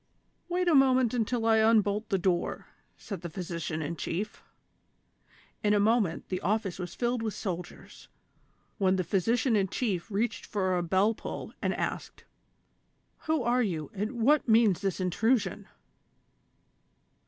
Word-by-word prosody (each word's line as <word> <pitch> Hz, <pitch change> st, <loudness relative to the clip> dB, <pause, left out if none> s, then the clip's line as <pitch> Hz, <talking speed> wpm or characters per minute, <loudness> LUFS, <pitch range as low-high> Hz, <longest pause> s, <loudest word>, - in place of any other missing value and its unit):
"Wait 360 Hz, +1 st, 0 dB
a 340 Hz, -, +4 dB
moment 260 Hz, -4 st, +4 dB
until 235 Hz, -1 st, 0 dB
I 225 Hz, -1 st, +4 dB
unbolt 215 Hz, -1 st, +3 dB
the 195 Hz, -, +2 dB
door," 180 Hz, -1 st, -1 dB, 0.3 s
said 200 Hz, -, -7 dB
the 170 Hz, -, -5 dB
physician 170 Hz, -2 st, -4 dB
in 160 Hz, +3 st, -3 dB
chief. 195 Hz, +6 st, -4 dB, 1.2 s
In 210 Hz, 0 st, +3 dB
a -, -, +3 dB
moment 210 Hz, -5 st, +1 dB
the 185 Hz, -1 st, -2 dB
office 195 Hz, -1 st, -1 dB
was 175 Hz, -2 st, -6 dB
filled 240 Hz, -1 st, -1 dB
with 220 Hz, -2 st, -3 dB
soldiers, 180 Hz, -3 st, -7 dB, 0.7 s
when 190 Hz, -1 st, +3 dB
the 185 Hz, -, 0 dB
physician 225 Hz, -, +1 dB
in 195 Hz, -2 st, +2 dB
chief 195 Hz, -3 st, -2 dB
readied 220 Hz, +3 st, -2 dB
for 185 Hz, -3 st, 0 dB
a 175 Hz, -, +1 dB
bell 190 Hz, +6 st, +2 dB
pull -, -, -7 dB
and -, -, 0 dB
asked: -, -, -4 dB, 0.5 s
" -, -, -44 dB
Who 315 Hz, -4 st, +1 dB
are 240 Hz, +2 st, +2 dB
you, 170 Hz, -8 st, -2 dB
and 210 Hz, +4 st, -3 dB
what 260 Hz, +3 st, +2 dB
means 220 Hz, -5 st, +4 dB
this 195 Hz, -2 st, -1 dB
intrusion 205 Hz, +2 st, 0 dB
210 Hz, 150 wpm, -29 LUFS, 185-230 Hz, 1.2 s, a